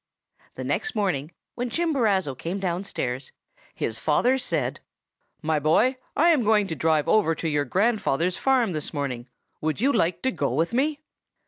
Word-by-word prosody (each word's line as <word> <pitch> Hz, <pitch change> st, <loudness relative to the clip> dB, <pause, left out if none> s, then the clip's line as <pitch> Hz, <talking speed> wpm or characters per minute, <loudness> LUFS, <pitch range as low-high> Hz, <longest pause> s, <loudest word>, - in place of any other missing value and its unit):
"The -, -, -5 dB
next 440 Hz, -, -1 dB
morning, 170 Hz, -7 st, -1 dB, 0.2 s
when 245 Hz, 0 st, -3 dB
Chimborazo 230 Hz, -, +1 dB
came 170 Hz, +9 st, -4 dB
downstairs, 170 Hz, -9 st, -3 dB, 0.4 s
his 110 Hz, -, -3 dB
father 245 Hz, -, +2 dB
said, -, -, -2 dB, 0.6 s
'My 155 Hz, 0 st, +1 dB
boy, 215 Hz, -, +3 dB, 0.2 s
I 335 Hz, +4 st, +5 dB
am 315 Hz, -6 st, +4 dB
going 210 Hz, -1 st, +3 dB
to 160 Hz, -, -2 dB
drive 155 Hz, 0 st, +1 dB
over 165 Hz, -7 st, +3 dB
to 165 Hz, -, -3 dB
your 145 Hz, -2 st, +1 dB
grandfather's 185 Hz, -, +1 dB
farm 255 Hz, -6 st, +2 dB
this 155 Hz, +1 st, -4 dB
morning; 130 Hz, -4 st, -3 dB, 0.3 s
would 155 Hz, +3 st, -1 dB
you 270 Hz, +5 st, +3 dB
like 170 Hz, -6 st, +1 dB
to 260 Hz, -, +2 dB
go 140 Hz, -, -1 dB
with 160 Hz, -, 0 dB
me? 290 Hz, +4 st, 0 dB
185 Hz, 160 wpm, -25 LUFS, 150-245 Hz, 0.6 s, I